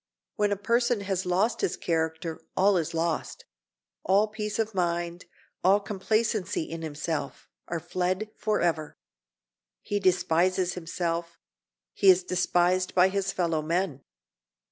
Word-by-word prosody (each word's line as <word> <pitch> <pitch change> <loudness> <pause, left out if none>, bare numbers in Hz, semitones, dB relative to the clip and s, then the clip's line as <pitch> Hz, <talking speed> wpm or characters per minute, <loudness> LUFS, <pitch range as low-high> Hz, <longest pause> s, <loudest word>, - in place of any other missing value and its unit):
When 210 -1 +1
a - - +2
person 235 +2 +1
has 190 -2 -2
lost 195 +6 +1
his - - 0
character 160 0 -2 0.2
all 195 +1 +4
is 165 -1 -2
lost—all 160 - -2
peace 210 -1 -4
of 220 -1 -1
mind, 175 -1 -1 0.4
all 195 +3 +5
complacency 210 -2 -1
in 165 +1 -6
himself, 155 -2 -4 0.2
are 170 - -2
fled 185 +5 -2
forever. 170 -8 -1 0.8
He 205 - -2
despises 185 0 +2
himself; 170 -1 -3 0.6
he 195 - +4
is 185 0 +6
despised 180 0 +1
by 185 +1 +6
his 195 0 -1
fellow 165 -3 0
men. 165 -3 -1
180 Hz, 120 wpm, -27 LUFS, 165-200 Hz, 0.8 s, is